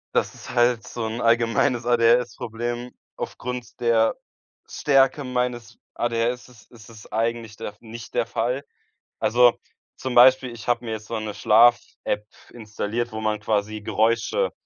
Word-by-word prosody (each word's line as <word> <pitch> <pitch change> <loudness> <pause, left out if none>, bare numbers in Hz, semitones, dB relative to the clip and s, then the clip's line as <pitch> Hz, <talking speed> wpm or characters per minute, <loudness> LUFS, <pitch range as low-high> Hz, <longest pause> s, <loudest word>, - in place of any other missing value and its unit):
Das - - 0
ist - - -10
halt 120 -2 +2
so 115 -2 -4
'n 115 +2 -4
allgemeines 115 +1 +2
ADHS 120 -1 +3
Problem. 120 +2 -5 0.2
Aufgrund 125 -1 -6
der 115 -2 +2 0.5
Stärke 135 0 +2
meines 125 -3 -3 0.2
ADHS 120 +1 -1
ist 115 -3 -20
ist 110 -3 -15
es 110 -2 -14
eigentlich 115 0 -2
der 105 - -7
nicht 115 +1 -10
der 115 - 0
Fall. 125 +5 -2 0.6
Also, 120 +1 +4 0.4
zum 130 -1 -5
Beispiel, 130 +1 +6
ich 115 -1 -10
habe 120 0 +1
mir 115 - -5
jetzt 110 -1 -5
so 115 - -3
'ne 110 -1 -4
Schlaf-App 115 -1 +3 0.3
installiert, 110 +1 -4
wo 110 - -4
man 110 -1 -1
quasi 110 0 -1
Geräusche, 115 - 0
115 Hz, 145 wpm, -23 LUFS, 110-120 Hz, 0.6 s, Beispiel